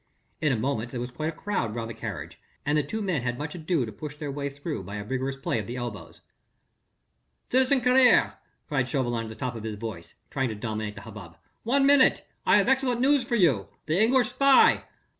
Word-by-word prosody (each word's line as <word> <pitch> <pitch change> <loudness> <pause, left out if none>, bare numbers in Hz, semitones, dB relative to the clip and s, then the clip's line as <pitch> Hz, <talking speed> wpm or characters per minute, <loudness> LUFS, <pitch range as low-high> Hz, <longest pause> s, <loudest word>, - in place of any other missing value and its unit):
In 150 - +2
a - - +2
moment 120 -1 -2
there 125 - -5
was 125 +1 -5
quite 155 +5 -3
a - - -2
crowd 155 - -3
round 115 -1 -3
the 115 - -6
carriage, - - -7 0.2
and 150 +1 +1
the 150 - +4
two 215 +10 -4
men 180 -8 0
had 120 0 -2
much 150 +2 -5
ado 165 -5 -1
to 110 - -7
push 150 +3 -8
their 150 -1 -5
way 140 0 -3
through 145 - -5
by 100 +3 -8
a 105 - -4
vigorous 130 +4 -2
play 135 -4 -2
of 105 - -6
their 120 - -5
elbows. 120 -5 -7 1.3
"Citizen 260 +1 +3
Carrier!" 250 0 +5 0.3
cried 135 -5 0
Chauvelin 120 -5 -1
at - - -8
the 110 - -8
top 125 0 -3
of 110 - -7
his 110 -1 -4
voice, 105 -6 -7 0.2
trying 135 -2 0
to 110 - -4
dominate 110 -1 -4
the 100 - -9
hubbub, 100 -6 -11 0.2
"one 275 +4 +2
minute... 280 -1 +4 0.2
I - - +6
have - - +2
excellent 265 -2 +2
news 275 +1 +3
for 240 -1 -1
you.... 145 - +3 0.2
The 160 +6 +1
English 245 +1 +4
spy...." 275 +2 +5
140 Hz, 220 wpm, -26 LUFS, -, 1.3 s, I